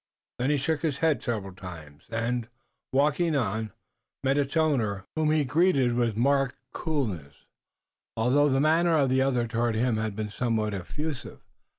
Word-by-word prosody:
Then 125 +3 +1
he 150 - +3
shook 155 +3 -1
his 150 -5 -1
head 155 -5 +2
several 105 -5 -3
times, 80 -6 -11
and, 115 +1 -1 0.4
walking 150 +4 +2
on, 110 -3 -1 0.5
met 135 0 +2
its 140 +3 -1
owner, 115 -12 +1
whom 155 -1 +1
he 155 -2 +2
greeted 140 -3 +3
with 120 -3 0
marked 135 +1 +2 0.2
coolness, 105 - -3 0.7
although 135 +6 +3
the 135 0 +2
manner 160 +3 +3
of 135 -3 +2
the 130 0 +3
other 130 -3 +1
toward 115 -1 0
him 115 0 +1
had 110 -2 -2
been 105 0 -3
somewhat 110 -3 -1
effusive. 140 - -5
125 Hz, 160 wpm, -27 LUFS, 110-145 Hz, 0.7 s, he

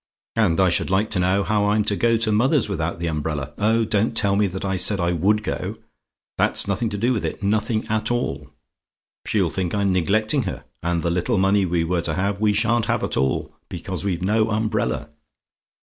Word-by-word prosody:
"And 100 -7 +2
I 95 -1 +4
should 85 - 0
like 95 +3 +1
to 95 - 0
know 95 +2 +2
how 105 -1 +1
I'm 105 +1 +2
to 105 -1 0
go 115 +2 +2
to 110 -1 +1
mother's 125 +5 +2
without 85 -4 -2
the 85 - -4
umbrella! 75 -3 -3
Oh, 110 +2 +2
don't 105 +1 0
tell 100 -2 +2
me 105 0 +2
that 95 +1 -5
I 95 0 0
said 100 +2 +2
I 85 0 +1
WOULD 100 +6 +1
go - - -4 0.6
that's - - +2
nothing 110 +3 -1
to 105 - -4
do 120 +5 +1
with 110 - -2
it; - - -4
nothing 110 +2 0
at 110 0 0
all. 75 - -2 0.8
She'll 95 -6 +1
think 90 +1 -2
I'm 100 -1 +1
neglecting 110 - +2
her, - - -7 0.2
and 85 -1 -1
the 85 - 0
little 90 +4 0
money 95 0 +3
we 85 -1 0
were 85 +1 0
to - - -2
have 100 +2 -1
we 105 -1 +3
sha'n't 110 +2 +1
have - - 0
at - - -1
all 65 0 -1 0.2
because 90 0 -5
we've 90 -3 -2
no 110 +3 +2
umbrella. 105 -8 -1
100 Hz, 210 wpm, -22 LUFS, 90-110 Hz, 0.8 s, I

